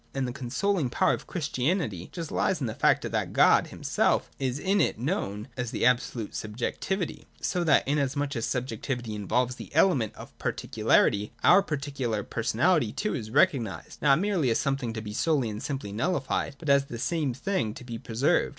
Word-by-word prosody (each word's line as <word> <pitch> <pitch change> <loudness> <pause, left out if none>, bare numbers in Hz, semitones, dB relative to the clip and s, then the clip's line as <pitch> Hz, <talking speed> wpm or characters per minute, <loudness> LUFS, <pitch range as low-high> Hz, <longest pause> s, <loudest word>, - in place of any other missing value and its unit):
And 135 -1 0
that 125 - -4
consoling 140 +5 -1
power - - +2
of - - -5
Christianity 145 - -1
just 165 -3 -6
lies 185 - +1
in 135 - -2
the 110 - -3
fact - - +3
that - - -2
God - - +5
himself - - 0
is 130 -1 -1
in 195 +6 +2
it - - +1
known 110 - -2
as 125 -2 -3
the 115 - -1
absolute 120 -3 +1
subjectivity, 130 - -3
so 180 - -1
that, 155 - +3
inasmuch 140 0 0
as 115 0 -1
subjectivity 125 -1 -3
involves 125 +5 0
the - - -9
element 130 - +3
of - - -11
particularity, 105 +1 +1
our 185 +3 +7
particular 140 - -2
personality - - +1
too - - -2
is 110 - -4
recognised 120 -4 +1
not 140 -2 +5
merely 180 -7 +1
as 115 - +2
something 135 -4 -1
to 110 - -4
be 105 -1 -6
solely 135 -3 +1
and 105 +1 -6
simply 135 -8 -4
nullified, 135 - -1
but 155 - -9
as 140 0 +5
at 140 - -13
the 120 - -5
same 150 +1 -1
time - - -12
something 135 - -1
to 135 - -9
be 120 -2 -6
preserved. 125 +11 +1
130 Hz, 185 wpm, -27 LUFS, 115-150 Hz, -, our